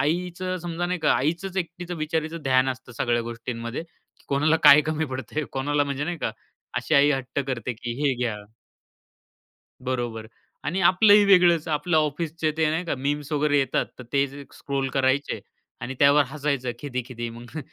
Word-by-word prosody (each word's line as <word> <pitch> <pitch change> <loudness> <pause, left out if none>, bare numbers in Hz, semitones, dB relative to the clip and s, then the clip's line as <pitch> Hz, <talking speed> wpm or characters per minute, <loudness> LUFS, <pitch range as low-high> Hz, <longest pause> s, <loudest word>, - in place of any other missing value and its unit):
आईचं 180 +4 -1
समजा 175 0 -3
नाही 180 0 -2
का 150 - +3
आईचंच 170 +9 -1
एकटीचं 175 0 -4
बिचारीचं 160 +1 -2
ध्यान 130 0 +3
असतं 130 -1 -6
सगळ्या 120 0 +1
गोष्टींमध्ये, 115 +2 -5 0.5
कोणाला 150 +3 +3
काय 145 +2 +10
कमी 155 0 0
पडतंय? 130 +3 -4
कोणाला, 145 +2 +1
म्हणजे 140 +1 -3
नाही 175 0 -3
का, 115 - -1 0.4
अशी 120 +6 0
आई 145 0 +6
हट्ट 135 0 -2
करते, 125 -2 -3
की 120 +1 -5
"हे 140 -3 +2
घ्या." 110 -3 -1 1.4
बरोबर 120 -4 -3 0.4
आणि 185 +4 -1
आपलं 185 +4 +6
ही 205 -1 +7
वेगळंच, 175 -4 +5
आपलं 155 +2 0
ऑफिसच 155 +2 -1
ते 160 -1 +2
नाही 165 +3 -1
का 165 - -1
मीम्स 145 +2 -2
वगैरे 145 0 +2
येतात, 135 -2 +1
तर 125 - -9
ते 140 0 +3
जे 140 +1 -10
स्क्रोल 135 -1 -3
करायचे 135 +1 +1 0.4
आणि 130 - -4
त्यावर 140 +1 +6
हसायचं 140 -4 -2
खिदी-खिदी. 125 -3 -5
मग 120 +6 -9
145 Hz, 165 wpm, -25 LUFS, 130-160 Hz, 1.4 s, काय